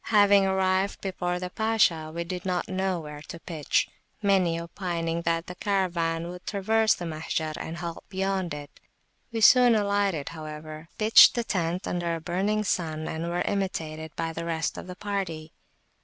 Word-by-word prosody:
Having 205 Hz, -2 st, +5 dB
arrived 190 Hz, +1 st, +1 dB
before 180 Hz, -2 st, -2 dB
the 180 Hz, 0 st, -5 dB
Pasha, 195 Hz, -8 st, +2 dB
we 170 Hz, +1 st, -3 dB
did 180 Hz, +1 st, -5 dB
not 180 Hz, -2 st, -1 dB
know 190 Hz, -1 st, -1 dB
where 150 Hz, -2 st, -8 dB
to 165 Hz, +2 st, -9 dB
pitch; 160 Hz, -4 st, 0 dB, 0.3 s
many 190 Hz, -5 st, +2 dB
opining 170 Hz, -1 st, -3 dB
that 165 Hz, 0 st, 0 dB
the 180 Hz, -, -7 dB
Caravan 170 Hz, -4 st, 0 dB
would 180 Hz, 0 st, -10 dB
traverse 220 Hz, +2 st, +2 dB
the 175 Hz, -, -6 dB
Mahjar 155 Hz, -1 st, -3 dB
and 165 Hz, +1 st, -5 dB
halt 170 Hz, -1 st, -6 dB
beyond 190 Hz, -2 st, -1 dB
it. 145 Hz, -1 st, -8 dB, 0.5 s
We 225 Hz, -1 st, -2 dB
soon 245 Hz, +1 st, +7 dB
alighted, 200 Hz, -7 st, +1 dB
however, 155 Hz, 0 st, -8 dB
pitched 215 Hz, +1 st, +8 dB
the 240 Hz, -, 0 dB
tent 180 Hz, -3 st, -1 dB
under 170 Hz, -1 st, -1 dB
a -, -, -5 dB
burning 195 Hz, +6 st, 0 dB
sun, 160 Hz, -5 st, -1 dB
and 165 Hz, +2 st, -3 dB
were 175 Hz, +1 st, -1 dB
imitated 160 Hz, -6 st, -3 dB
by 165 Hz, 0 st, -2 dB
the 165 Hz, -, -4 dB
rest 165 Hz, -1 st, -2 dB
of -, -, -8 dB
the 180 Hz, -, -7 dB
party. 185 Hz, -6 st, -4 dB
175 Hz, 170 wpm, -27 LUFS, 165-195 Hz, 0.5 s, pitched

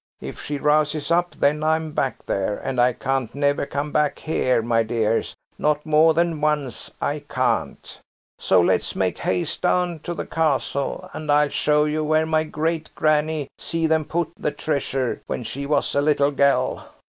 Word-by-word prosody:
If -, -, -8 dB
she 145 Hz, -, -4 dB
rouses 150 Hz, +1 st, +1 dB
up, 175 Hz, +1 st, +1 dB
then 150 Hz, +2 st, +1 dB
I'm 160 Hz, 0 st, +1 dB
back 135 Hz, -3 st, -2 dB
there, 100 Hz, +1 st, -1 dB
and 130 Hz, -2 st, -1 dB
I 125 Hz, +1 st, +4 dB
can't 130 Hz, 0 st, -2 dB
never 140 Hz, 0 st, +1 dB
come 145 Hz, +1 st, -3 dB
back 150 Hz, -1 st, +1 dB
here, 130 Hz, -7 st, 0 dB
my 115 Hz, 0 st, +2 dB
dears, 115 Hz, 0 st, 0 dB, 0.2 s
not 150 Hz, 0 st, +1 dB
more 155 Hz, +1 st, +4 dB
than 170 Hz, -2 st, +1 dB
once, 150 Hz, -5 st, -1 dB
I -, -, -1 dB
can't. -, -, -2 dB, 0.4 s
So 95 Hz, -, +4 dB
let's 85 Hz, -, +1 dB
make -, -, -1 dB
haste 90 Hz, -1 st, -1 dB
down 180 Hz, -2 st, +1 dB
to 175 Hz, +3 st, -5 dB
the -, -, -4 dB
Castle, 140 Hz, -3 st, -1 dB
and 155 Hz, 0 st, -3 dB
I'll 145 Hz, 0 st, +4 dB
show 150 Hz, +1 st, +2 dB
you 155 Hz, +1 st, -1 dB
where 155 Hz, +1 st, +2 dB
my 160 Hz, 0 st, +1 dB
great 160 Hz, +1 st, -2 dB
granny 155 Hz, -1 st, +1 dB
see 165 Hz, -1 st, -1 dB
them 160 Hz, -1 st, +2 dB
put 170 Hz, 0 st, -2 dB
the -, -, -2 dB
treasure 140 Hz, -3 st, -2 dB
when -, -, -3 dB
she 140 Hz, +4 st, -5 dB
was 145 Hz, -1 st, +1 dB
a 140 Hz, -, +2 dB
little 145 Hz, -1 st, +2 dB
gell." 140 Hz, 0 st, +1 dB
150 Hz, 175 wpm, -23 LUFS, 140-155 Hz, 0.4 s, I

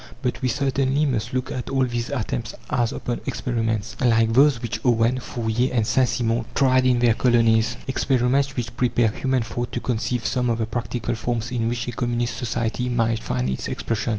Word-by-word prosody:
But 125 Hz, -, -2 dB
we 130 Hz, -, +1 dB
certainly 140 Hz, +2 st, +1 dB
must 120 Hz, -4 st, -1 dB
look 130 Hz, 0 st, -2 dB
at 125 Hz, -, -4 dB
all 135 Hz, -1 st, +2 dB
these 120 Hz, -1 st, -3 dB
attempts 110 Hz, -, -3 dB, 0.2 s
as 120 Hz, -2 st, +1 dB
upon 120 Hz, -, -4 dB
experiments 115 Hz, -3 st, -2 dB
like 115 Hz, -2 st, +3 dB
those 135 Hz, 0 st, +5 dB
which 115 Hz, -1 st, -4 dB
Owen, 120 Hz, 0 st, +3 dB
Fourier, 120 Hz, +1 st, -1 dB
and 115 Hz, -3 st, +1 dB
Saint 125 Hz, +2 st, +2 dB
Simon 115 Hz, 0 st, 0 dB
tried 130 Hz, -1 st, +4 dB
in 125 Hz, -1 st, +4 dB
their 120 Hz, -1 st, +4 dB
colonies 115 Hz, -1 st, +3 dB
experiments 135 Hz, +1 st, +1 dB
which 120 Hz, -2 st, -4 dB
prepare 120 Hz, -2 st, +2 dB
human 130 Hz, +3 st, 0 dB
thought 120 Hz, +2 st, -4 dB
to -, -, -1 dB
conceive 120 Hz, 0 st, -2 dB
some 125 Hz, -1 st, 0 dB
of 115 Hz, -, +1 dB
the 115 Hz, -, 0 dB
practical 120 Hz, +1 st, -3 dB
forms 120 Hz, 0 st, -2 dB
in 115 Hz, -2 st, 0 dB
which 120 Hz, 0 st, -3 dB
a -, -, -2 dB
communist 120 Hz, 0 st, -1 dB
society 120 Hz, +1 st, -2 dB
might 115 Hz, -2 st, +1 dB
find 65 Hz, 0 st, -1 dB
its 65 Hz, 0 st, -3 dB
expression. 115 Hz, 0 st, -2 dB
120 Hz, 190 wpm, -23 LUFS, 115-125 Hz, 0.2 s, those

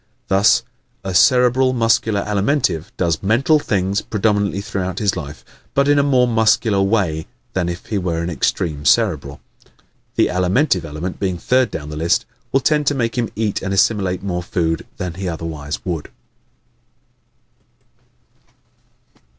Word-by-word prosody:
Thus, 100 Hz, +4 st, +4 dB, 0.4 s
a 95 Hz, -, -4 dB
Cerebral 125 Hz, +5 st, +4 dB
Muscular 115 Hz, -3 st, +2 dB
Alimentive 105 Hz, -, 0 dB
does 85 Hz, -3 st, 0 dB
MENTAL 125 Hz, +10 st, +3 dB
things 100 Hz, -5 st, 0 dB
predominantly 100 Hz, -2 st, 0 dB
throughout 95 Hz, -4 st, -4 dB
his 100 Hz, -2 st, +1 dB
life, 75 Hz, -3 st, -7 dB, 0.3 s
but 140 Hz, 0 st, +3 dB
in 145 Hz, 0 st, +4 dB
a -, -, +5 dB
more 130 Hz, -3 st, +3 dB
MUSCULAR 110 Hz, -3 st, +2 dB
way 95 Hz, -6 st, 0 dB, 0.3 s
than 90 Hz, -2 st, -1 dB
if 85 Hz, 0 st, -6 dB
he 105 Hz, -, -2 dB
were 85 Hz, -2 st, -2 dB
an 85 Hz, -, -3 dB
extreme 80 Hz, -2 st, -1 dB
Cerebral. 70 Hz, +1 st, +1 dB, 0.8 s
The -, -, +4 dB
Alimentive 90 Hz, -, +1 dB
element, 80 Hz, +4 st, -5 dB
being 95 Hz, -3 st, -1 dB
third 130 Hz, +7 st, +2 dB
down 75 Hz, -1 st, -6 dB
the 75 Hz, -, -6 dB
list, 85 Hz, +9 st, +1 dB, 0.3 s
will 135 Hz, -, +2 dB
tend 150 Hz, +1 st, +1 dB
to 145 Hz, -, +3 dB
make 115 Hz, -3 st, -1 dB
him 120 Hz, -3 st, -1 dB
eat 105 Hz, -2 st, -1 dB
and 95 Hz, 0 st, -2 dB
assimilate 95 Hz, -2 st, +1 dB
more 90 Hz, -3 st, -2 dB
food 85 Hz, -2 st, -2 dB
than 90 Hz, -2 st, -4 dB
he 95 Hz, +1 st, -4 dB
otherwise 80 Hz, -3 st, -5 dB
would. 85 Hz, -5 st, -4 dB
95 Hz, 145 wpm, -19 LUFS, 85-115 Hz, 0.8 s, a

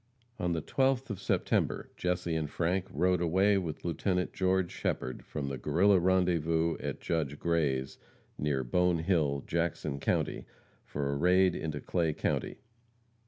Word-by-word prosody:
On 90 Hz, -3 st, 0 dB
the 80 Hz, -2 st, -2 dB
12th 135 Hz, -2 st, +1 dB
of 100 Hz, -2 st, -5 dB
September -, -, 0 dB
Jesse 90 Hz, -1 st, -1 dB
and 80 Hz, -2 st, -1 dB
Frank 90 Hz, +4 st, -1 dB
rode 90 Hz, +4 st, +1 dB
away 95 Hz, +4 st, +3 dB
with 80 Hz, -4 st, -5 dB
Lieutenant 90 Hz, +2 st, -1 dB
George 95 Hz, -1 st, +1 dB
Shepherd, 65 Hz, -, -3 dB
from 70 Hz, -2 st, -5 dB
the 70 Hz, -2 st, -4 dB
Guerrilla 95 Hz, +8 st, +4 dB
rendezvous 85 Hz, -3 st, +2 dB
at -, -, -4 dB
Judge 75 Hz, -4 st, -1 dB
Gray's, 75 Hz, -6 st, 0 dB, 0.4 s
near 70 Hz, -3 st, -1 dB
Bone 90 Hz, +7 st, +2 dB
Hill, 80 Hz, -5 st, +1 dB
Jackson 85 Hz, -4 st, -2 dB
county, -, -, -1 dB, 0.4 s
for 70 Hz, -1 st, -3 dB
a -, -, -1 dB
raid 90 Hz, +5 st, +4 dB
into 75 Hz, -2 st, -3 dB
Clay 80 Hz, +1 st, 0 dB
county. -, -, -2 dB
85 Hz, 145 wpm, -31 LUFS, 75-90 Hz, 0.4 s, Guerrilla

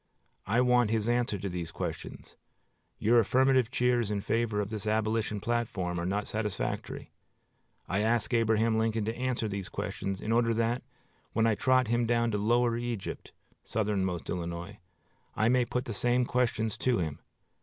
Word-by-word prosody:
I 115 Hz, +5 st, +3 dB
want 125 Hz, -2 st, +4 dB
his 110 Hz, 0 st, 0 dB
answer 120 Hz, -3 st, +1 dB
to 100 Hz, -, -4 dB
these 90 Hz, -3 st, -4 dB
questions. -, -, -6 dB, 0.6 s
Your 115 Hz, +3 st, +4 dB
affirmative 130 Hz, +1 st, +3 dB
cheers 125 Hz, -3 st, +1 dB
in 105 Hz, -1 st, -1 dB
favor 115 Hz, 0 st, 0 dB
of 105 Hz, 0 st, -2 dB
this 110 Hz, -1 st, -4 dB
Abolition 110 Hz, 0 st, 0 dB
platform 105 Hz, -6 st, -1 dB
are 85 Hz, -, -2 dB
not 100 Hz, +2 st, -1 dB
satisfactory. 105 Hz, -2 st, -3 dB, 0.8 s
I 95 Hz, -, 0 dB
ask 115 Hz, +3 st, +1 dB
Abraham 110 Hz, -1 st, +3 dB
Lincoln 110 Hz, -1 st, 0 dB
to 110 Hz, +2 st, -2 dB
answer 125 Hz, -3 st, -1 dB
these 100 Hz, -2 st, -4 dB
questions, 95 Hz, -1 st, -4 dB
in 110 Hz, -, -3 dB
order 115 Hz, 0 st, +3 dB
that, 115 Hz, +2 st, 0 dB, 0.5 s
when 115 Hz, -, +2 dB
I 115 Hz, -, +4 dB
trot 130 Hz, +4 st, +3 dB
him 120 Hz, 0 st, +2 dB
down 115 Hz, 0 st, +2 dB
to 105 Hz, -, 0 dB
lower 120 Hz, +2 st, +2 dB
Egypt 120 Hz, -3 st, -4 dB, 0.3 s
[Southernmost 95 Hz, -5 st, -1 dB
Illinois] 85 Hz, +3 st, -5 dB, 0.6 s
I 110 Hz, +1 st, +3 dB
may 125 Hz, 0 st, +3 dB
put 125 Hz, +1 st, -2 dB
the 115 Hz, -, -4 dB
same 120 Hz, +5 st, +2 dB
questions 115 Hz, -3 st, 0 dB
to 125 Hz, -2 st, +2 dB
him. 80 Hz, -5 st, -3 dB
110 Hz, 165 wpm, -30 LUFS, 105-120 Hz, 0.8 s, want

